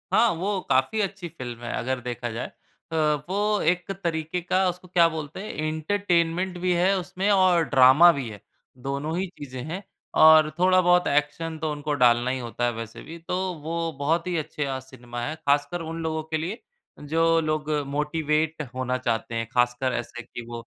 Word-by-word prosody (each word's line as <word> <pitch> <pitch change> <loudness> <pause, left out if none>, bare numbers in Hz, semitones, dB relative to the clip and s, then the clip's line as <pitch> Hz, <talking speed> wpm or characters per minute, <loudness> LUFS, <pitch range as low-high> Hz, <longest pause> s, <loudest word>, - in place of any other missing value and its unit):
हाँ, 235 +1 +5
वो 195 +4 -1
काफ़ी 130 +12 +2
अच्छी 195 -2 -3
फ़िल्म 125 -7 -8
है 120 - -4
अगर 130 +1 -2
देखा 120 0 -4
जाए 115 +2 -4
अ, 165 - -13 0.3
वो 205 +2 +1
एक 180 +1 -4
तरीके 160 0 -1
का 185 +2 +1
उसको 180 +1 -7
क्या 175 -1 +5
बोलते 155 -1 -6
हैं 215 - -6 0.2
एंटरटेनमेंट 175 +2 0
भी 180 0 +1
है 180 +3 +3
उसमें 185 +2 -2
और 185 -4 +4
ड्रामा 135 +6 +7
भी 140 -6 -4
है, 105 -2 -10 0.4
दोनों 140 +5 -3
ही 190 +1 -1
चीजें 130 -3 -7
हैं 170 +5 -5 0.4
और 155 -1 +8
थोड़ा-बहुत 180 -1 +4
एक्शन 150 +3 0
तो 155 -1 -2
उनको 150 0 -3
डालना 120 +1 +4
ही 130 - -2
होता 120 0 -3
है 120 - +1
वैसे 115 0 -7
भी, 165 - -9
तो 180 +2 -2
वो 165 +1 -2
बहुत 165 +5 0
ही 180 - -1
अच्छे 150 -1 -3
अ, 135 -1 -3
सिनेमा 120 -2 -9
हैं 150 - -3
खासकर 145 +4 +1
उन 165 0 -5
लोगों 160 -1 -2
के - - +3
लिए 180 +9 -4 0.4
जो 165 +2 +2
लोग 155 -1 -2 0.2
मोटिवेट 150 +2 0
होना 130 0 -1
चाहते 115 -2 -2
हैं, 115 0 -2
खासकर 125 +1 +1
ऐसे 120 0 -7
कि 120 0 -9
वो 120 0 -6
155 Hz, 185 wpm, -25 LUFS, 130-175 Hz, 0.4 s, और